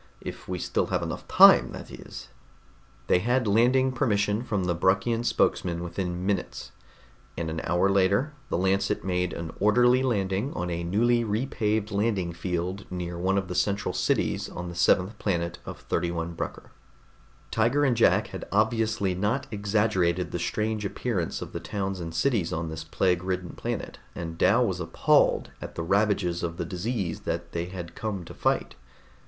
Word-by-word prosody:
If - - -8
we 90 - -2
still - - -1
have - - -1
enough - - -5
time, - - +7
that - - -9
is." - - -10 0.8
They 90 - +3
had 120 +5 +1
landing 125 +5 +3
permission 105 -3 +1
from 105 -6 -1
the 90 -1 +1
Bruckian 95 +7 +1
spokesman 85 -7 +1
within 90 0 -3
minutes, 100 -2 -2 0.7
and 80 -1 -2
an 80 0 -3
hour 90 +3 +2
later 100 +9 +2 0.2
the - - 0
Lancet 95 +2 +1
made 90 -1 0
an 85 -1 -5
orderly 120 +5 +4
landing 105 -1 0
on 90 0 -3
a 85 0 -2
newly 120 +7 +2
repaved 110 -1 -1
landing 100 -4 0
field 90 +3 -3
near 90 -1 -4
one 95 +3 +1
of 95 -1 -1
the 90 - -4
central 100 +2 0
cities - - 0
on 85 0 -6
the 85 - -8
seventh 90 +4 +2
planet 85 -4 -1
of - - -7
31 85 -1 -2
Brucker. - - -6 0.8
Tiger 120 +6 +2
and 130 -3 +3
Jack 115 - +3
had - - -7
obviously 110 -2 +1
not 105 +9 0
exaggerated 100 -4 +1
the - - -3
strange 110 0 -1
appearance 100 -3 -2
of - - -11
the - - -3
towns 95 -2 -3
and 80 -1 -6
cities 105 -3 +1
on 80 0 -2
this 80 0 -6
plague 90 +2 +1
ridden 90 -1 -3
planet, - - -5 0.2
and 80 -1 -6
Dal 120 +5 +4
was 95 -5 -2
appalled 80 -1 +2
at - - -8
the 85 - -3
ravages 100 -2 +1
of 85 -1 -3
the 85 - -2
disease 95 0 -3
that - - -4
they 85 0 -2
had 90 -2 -7
come 100 -5 -4
to - - -10
fight. - - 0
95 Hz, 170 wpm, -27 LUFS, 85-110 Hz, 0.8 s, time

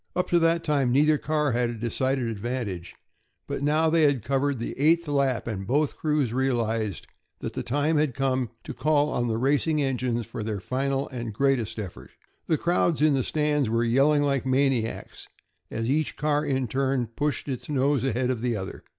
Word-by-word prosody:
Up 180 - 0
to 175 - +5
that 165 0 +2
time 140 -5 +1
neither 150 +3 +4
car 150 -2 0
had 120 0 +1
a 120 - -4
decided 125 +3 -1
advantage, 110 -5 -4 0.5
but - - -4
now 155 +3 +2
they 165 +1 +3
had 140 -7 +3
covered 135 +2 0
the 115 - -4
eighth 165 +3 +3
lap, 140 -5 +1
and 95 -4 -4
both 145 +4 +1
crews 150 -6 0
realized 115 -6 -1 0.3
that - - -6
the - - -3
time 145 +5 0
had 150 -4 0
arrived 130 -3 +1
to - - -6
call 145 +3 +1
on 120 0 0
the 110 -1 -1
racing 145 +5 +1
engines 125 -4 -1
for - - -7
their 105 -1 -3
final 135 +5 -1
and 120 -4 -5
greatest 135 -4 +1
effort. 100 -5 -7 0.4
The 160 - +2
crowds 170 -2 +1
in 155 -1 +5
the 135 - +2
stands 150 -2 0
were 115 +1 +1
yelling 140 +5 +3
like 140 -3 +1
maniacs, 130 -3 -1 0.4
as 115 +1 -3
each 150 +3 0
car 150 0 +1
in 135 -3 0
turn 130 +1 0
pushed 145 +7 -3
its 130 0 -5
nose 140 -1 +1
ahead 125 0 0
of 120 -3 -3
the 120 -1 0
other. 95 -1 -6
135 Hz, 190 wpm, -26 LUFS, 120-150 Hz, 0.5 s, to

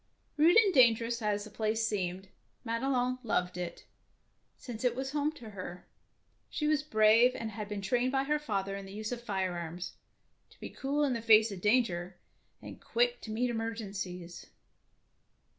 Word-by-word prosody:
Rude 325 +6 +5
and 415 -4 +5
dangerous 235 -2 +4
as 205 -1 0
the 215 - -11
place 220 +1 0
seemed, 190 -2 -3 0.4
Madelon 250 +2 0
loved 180 -7 -1
it, 180 -1 -6 0.7
since 235 -2 -8
it 245 -2 +2
was 265 +1 -3
home 295 +1 0
to 225 -7 -11
her. 180 -2 -8 0.6
She 300 - -3
was 300 -1 +2
brave, 225 -2 +4
and 225 -1 -4
had 210 0 -6
been 205 -1 -4
trained 245 +5 +1
by 270 0 +1
her 300 +2 0
father 195 -8 -2
in 195 -1 -7
the 195 - -10
use 215 +2 -5
of 240 -1 -4
firearms, 180 -5 -3 0.6
to - - -22
be - - -7
cool 285 +2 -1
in 275 -3 +2
the 230 - -3
face 220 -1 +6
of 190 -3 -7
danger 190 -5 +1 0.5
and - - -10
quick 485 +1 +1
to - - -9
meet 240 +3 0
emergencies. 195 -6 -5
225 Hz, 170 wpm, -31 LUFS, 195-255 Hz, 0.7 s, face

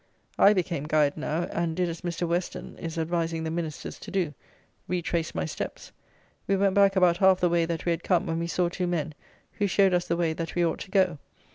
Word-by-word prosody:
I 205 - +7
became 170 -6 -1
guide 150 -2 +2
now; 155 +2 -2
and 165 -1 -1
did 180 0 +1
as 165 -1 -5
Mr. 175 0 -2
Western 175 +2 -3
is 165 0 -5
advising 165 0 -1
the 160 - -2
Ministers 165 -2 -5
to - - -9
do, 185 -6 -1 0.5
retraced 170 -2 -2
my 80 - -1
steps. - - -6 0.6
We 195 - +3
went 195 0 +2
back 200 0 +4
about 180 -2 +4
half 190 0 +5
the 175 - +3
way 170 -1 +2
that 165 -1 -3
we 175 - +2
had 170 0 -2
come, 180 0 +2
when 165 -2 -2
we 170 - -2
saw 175 +1 +1
two 180 +1 -2
men, 165 -3 -2 0.5
who 205 - +2
showed 195 0 +3
us 175 0 +1
the 170 - 0
way 165 -2 +1
that 165 0 -5
we 175 -1 +3
ought 165 - -1
to - - -8
go. 185 -6 +2
170 Hz, 230 wpm, -27 LUFS, 165-180 Hz, 0.6 s, I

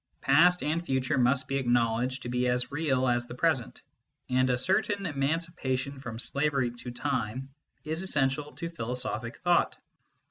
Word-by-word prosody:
Past 175 +6 +5
and 160 +3 0
future 130 -4 0
must 125 +2 +2
be 135 - 0
acknowledged 120 0 +1
to 120 - -5
be 125 0 +1
as 125 +1 0
real 140 -4 +1
as 120 0 +1
the 120 - -8
present, 135 -4 0 0.5
and 130 0 +3
a 125 - +2
certain 195 - 0
emancipation 140 -3 -1
from 120 -4 -6
slavery 140 0 0
to 120 +1 -9
time 130 0 -3 0.3
is 160 +2 -2
essential 145 -5 0
to 170 0 -5
philosophic 120 -4 -4
thought. 175 -1 +2
130 Hz, 150 wpm, -29 LUFS, 125-155 Hz, 0.5 s, Past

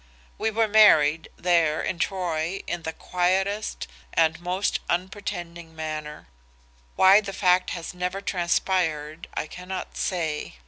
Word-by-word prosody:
"We 220 - +1
were 220 +1 +1
married, 165 -8 +5
there, 165 -3 +2
in 180 - -3
Troy 175 -1 -1
in 175 - -3
the 160 - -4
quietest 190 +5 -1 0.3
and 165 +1 +2
most 180 +3 -1
unpretending 175 -3 -4
manner. 155 -1 -6 0.7
Why 195 +2 +7
the 200 -2 -6
fact 185 -1 +3
has 170 - -7
never 180 +2 -3
transpired 170 -4 -1
I - - -1
cannot 180 +3 -7
say. 160 - -2
175 Hz, 125 wpm, -25 LUFS, 160-190 Hz, 0.7 s, Why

